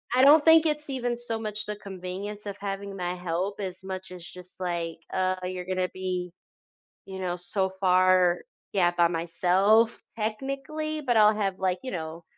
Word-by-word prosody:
I 255 Hz, -, +5 dB
don't 295 Hz, +2 st, +8 dB
think 325 Hz, 0 st, +7 dB
it's 300 Hz, -1 st, -1 dB
even 245 Hz, -3 st, -1 dB
so 235 Hz, -2 st, -4 dB
much 215 Hz, -1 st, -4 dB
the 210 Hz, -, -4 dB
convenience 200 Hz, +1 st, -7 dB
of 200 Hz, -1 st, -5 dB
having 200 Hz, 0 st, -4 dB
my 180 Hz, -1 st, -2 dB
help 180 Hz, +3 st, -2 dB
as 190 Hz, -2 st, -5 dB
much 190 Hz, -1 st, -6 dB
as 180 Hz, -2 st, -9 dB
just, 180 Hz, 0 st, -13 dB
like, 170 Hz, -2 st, -2 dB, 0.2 s
uh, 185 Hz, 0 st, +1 dB
you're 180 Hz, 0 st, -4 dB
going 185 Hz, 0 st, -3 dB
to 180 Hz, 0 st, +1 dB
be, 180 Hz, -1 st, -3 dB, 0.7 s
you 190 Hz, -1 st, -7 dB
know, 180 Hz, -1 st, -2 dB
so 190 Hz, +2 st, -1 dB
far, 185 Hz, -1 st, +4 dB, 0.3 s
yeah, 175 Hz, -3 st, +3 dB
by 175 Hz, -1 st, +3 dB
myself 185 Hz, +7 st, +2 dB, 0.2 s
technically, 275 Hz, +8 st, -3 dB
but 245 Hz, -5 st, +1 dB
I'll 215 Hz, 0 st, +6 dB
have, 195 Hz, -3 st, -1 dB
like, 185 Hz, -1 st, 0 dB
you 260 Hz, -, -4 dB
know, 165 Hz, -1 st, -5 dB
190 Hz, 180 wpm, -27 LUFS, 180-215 Hz, 0.7 s, don't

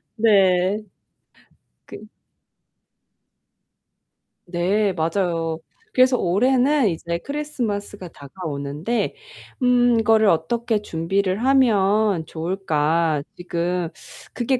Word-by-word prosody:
네. 195 Hz, -3 st, +3 dB, 1.1 s
그 -, -, -9 dB, 2.5 s
네, 190 Hz, +4 st, 0 dB
맞아요. 165 Hz, -1 st, -1 dB, 0.3 s
그래서 255 Hz, 0 st, +4 dB
올해는 255 Hz, +7 st, +2 dB
이제 170 Hz, 0 st, -4 dB
크리스마스가 220 Hz, -8 st, -4 dB
다가오는데 150 Hz, -, -4 dB, 0.5 s
음 245 Hz, -2 st, +3 dB
이거를 220 Hz, -1 st, +3 dB
어떻게 215 Hz, +6 st, 0 dB
준비를 190 Hz, +4 st, -1 dB
하면 210 Hz, -8 st, +3 dB
좋을까. 160 Hz, -3 st, -1 dB
지금 175 Hz, 0 st, -2 dB, 0.4 s
그게 250 Hz, +1 st, 0 dB
195 Hz, 180 characters per minute, -22 LUFS, 170-230 Hz, 2.5 s, 그래서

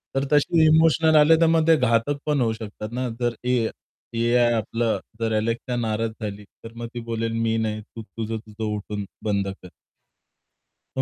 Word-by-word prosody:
तर 135 Hz, +1 st, +1 dB
तशी 160 Hz, +2 st, +4 dB
इमोशनल 160 Hz, 0 st, +4 dB
आले 155 Hz, +2 st, +7 dB
तर -, -, +6 dB
मग 160 Hz, 0 st, +3 dB
ते 165 Hz, -, +7 dB
घातक 125 Hz, +2 st, +1 dB
पण 150 Hz, -3 st, +1 dB
होऊ 115 Hz, -2 st, +1 dB
शकतात 110 Hz, -1 st, -7 dB
ना, 125 Hz, +1 st, -2 dB
जर 120 Hz, -1 st, 0 dB
ए 125 Hz, 0 st, +2 dB, 0.6 s
AI 120 Hz, +1 st, +3 dB
आपलं 115 Hz, +1 st, -1 dB, 0.2 s
जर 115 Hz, -1 st, 0 dB
Alexa 115 Hz, +3 st, -2 dB
नाराज 115 Hz, 0 st, -1 dB
झाली, 105 Hz, -1 st, -5 dB, 0.2 s
तर 115 Hz, -, -9 dB
मग 120 Hz, 0 st, -5 dB
ती 120 Hz, -, -4 dB
बोलेल 115 Hz, 0 st, -1 dB
मी 115 Hz, 0 st, +1 dB
नाही 110 Hz, -1 st, -2 dB
तू 115 Hz, +2 st, -11 dB
तुझं, 110 Hz, +2 st, -5 dB
तुझं 110 Hz, 0 st, -9 dB
उठून 105 Hz, 0 st, -5 dB, 0.2 s
बंद 100 Hz, -2 st, 0 dB, 0.2 s
कर. 90 Hz, -, -10 dB, 1.3 s
तर -, -, +1 dB
115 Hz, 180 wpm, -24 LUFS, 110-135 Hz, 1.3 s, आले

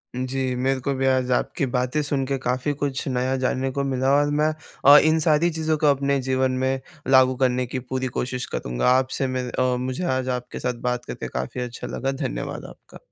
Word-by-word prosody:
जी, 130 Hz, 0 st, -2 dB
मेरे 130 Hz, +1 st, 0 dB
को 140 Hz, +2 st, -1 dB
भी 135 Hz, 0 st, -1 dB
आज 130 Hz, -1 st, +2 dB
आपकी 125 Hz, -, 0 dB
बातें 125 Hz, +3 st, 0 dB
सुन 140 Hz, -2 st, -1 dB
के 135 Hz, +1 st, -1 dB
काफ़ी 130 Hz, +3 st, -1 dB
कुछ 145 Hz, -1 st, -3 dB
नया 130 Hz, 0 st, 0 dB
जानने 130 Hz, +1 st, -1 dB
को 140 Hz, +1 st, -2 dB
मिला 135 Hz, -1 st, 0 dB
और 145 Hz, -, 0 dB
मैं 155 Hz, -, +3 dB, 0.4 s
अ, 145 Hz, +1 st, +10 dB
इन 155 Hz, +1 st, +4 dB
सारी 155 Hz, +1 st, +3 dB
चीज़ों 160 Hz, -1 st, 0 dB
को 150 Hz, -, +2 dB
अपने 140 Hz, 0 st, +2 dB
जीवन 130 Hz, 0 st, +1 dB
में 130 Hz, 0 st, +1 dB, 0.3 s
लागू 130 Hz, -1 st, +5 dB
करने 125 Hz, -1 st, +1 dB
की 130 Hz, +2 st, -4 dB
पूरी 130 Hz, +1 st, -3 dB
कोशिश 125 Hz, 0 st, -3 dB
करूँगा। -, -, 0 dB
आपसे 130 Hz, +1 st, +1 dB
मिल 130 Hz, -1 st, -3 dB
अ, 130 Hz, 0 st, +1 dB
मुझे 130 Hz, +6 st, -3 dB
आज 130 Hz, 0 st, -2 dB
आपके 125 Hz, -, -8 dB
साथ 125 Hz, -, -1 dB
बात 125 Hz, 0 st, -1 dB
करके -, -, -6 dB
काफ़ी 65 Hz, -, -4 dB
अच्छा 120 Hz, -1 st, -6 dB
लगा, 135 Hz, +1 st, -2 dB
धन्यवाद 135 Hz, -1 st, -4 dB
आपका। -, -, -15 dB
130 Hz, 205 wpm, -23 LUFS, 125-140 Hz, 0.4 s, अ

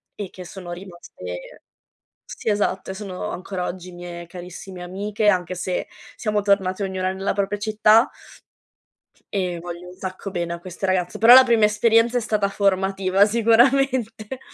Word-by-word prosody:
e 205 Hz, -3 st, -6 dB
che 180 Hz, 0 st, -10 dB
sono 175 Hz, -1 st, -9 dB
rimaste 175 Hz, -, -9 dB, 0.6 s
sì, -, -, -6 dB
esatto, 205 Hz, -2 st, 0 dB
sono 195 Hz, 0 st, -6 dB
ancora 185 Hz, 0 st, -4 dB
oggi 180 Hz, 0 st, -7 dB
mie 175 Hz, -1 st, -8 dB
carissime 180 Hz, +1 st, -9 dB
amiche, 205 Hz, +4 st, -1 dB
anche 185 Hz, -2 st, +2 dB
se 180 Hz, 0 st, -3 dB, 0.3 s
siamo 210 Hz, -2 st, 0 dB
tornate 200 Hz, -1 st, +1 dB
ognuna 190 Hz, -1 st, -1 dB
nella 195 Hz, +1 st, -2 dB
propria 200 Hz, 0 st, -1 dB
città. 215 Hz, +2 st, +4 dB, 1.2 s
E 180 Hz, -3 st, -1 dB
voglio 175 Hz, +1 st, -8 dB
un -, -, -11 dB
sacco 185 Hz, +1 st, -6 dB
bene 170 Hz, -2 st, -2 dB
a 170 Hz, -, -6 dB
queste 185 Hz, +2 st, -6 dB
ragazze. 185 Hz, -2 st, 0 dB
Però 230 Hz, +2 st, +8 dB
la 260 Hz, 0 st, +11 dB
prima 230 Hz, -4 st, +4 dB
esperienza 230 Hz, +3 st, +3 dB
è -, -, 0 dB
stata 215 Hz, -2 st, 0 dB
formativa 195 Hz, 0 st, +2 dB
sicuramente. 235 Hz, +1 st, +2 dB
195 Hz, 150 wpm, -22 LUFS, 180-215 Hz, 1.2 s, la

